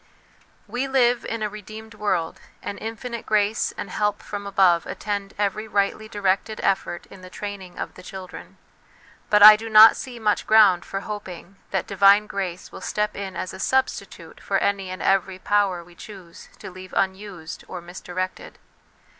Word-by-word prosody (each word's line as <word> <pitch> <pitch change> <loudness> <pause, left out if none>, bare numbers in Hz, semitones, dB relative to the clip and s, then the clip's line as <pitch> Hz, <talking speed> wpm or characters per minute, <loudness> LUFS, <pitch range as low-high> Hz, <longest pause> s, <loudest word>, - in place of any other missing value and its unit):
We 255 +3 -3
live 250 -2 +2
in 225 -1 -3
a - - +1
redeemed 215 +2 -10
world, 190 -6 -2 0.2
and 200 - -5
infinite 230 +1 -6
grace 210 0 +1
and 195 - -6
help 210 +1 -1
from 200 -1 -6
above 185 -4 +3
attend 200 -2 -4
every 210 +1 -1
rightly 205 +1 0
directed 205 +1 -1
effort 190 -3 -1
in 195 - -12
the 185 - -11
training 195 -2 -8
of - - -5
the - - -13
children; 185 0 -10 0.7
but 210 -1 +5
I 215 0 +12
do 225 +1 -6
not 220 +1 +9
see 250 -2 -7
much 215 -2 0
ground 210 -5 +5
for 195 - -4
hoping 195 -3 -8
that 190 -3 -1
divine 200 +1 +5
grace 190 -4 -5
will - - -10
step 210 0 -2
in 195 -2 -6
as 180 - -5
a 190 - -9
substitute 265 +5 -2
for - - 0
any 195 -2 -1
and 185 +1 -6
every 190 -1 +1
power 195 -3 +1
we 175 +1 -18
choose 180 -2 -12
to - - -9
leave 185 0 -11
unused 190 -4 -3
or 180 - -6
misdirected. 180 +1 -6
200 Hz, 170 wpm, -23 LUFS, 185-215 Hz, 0.7 s, I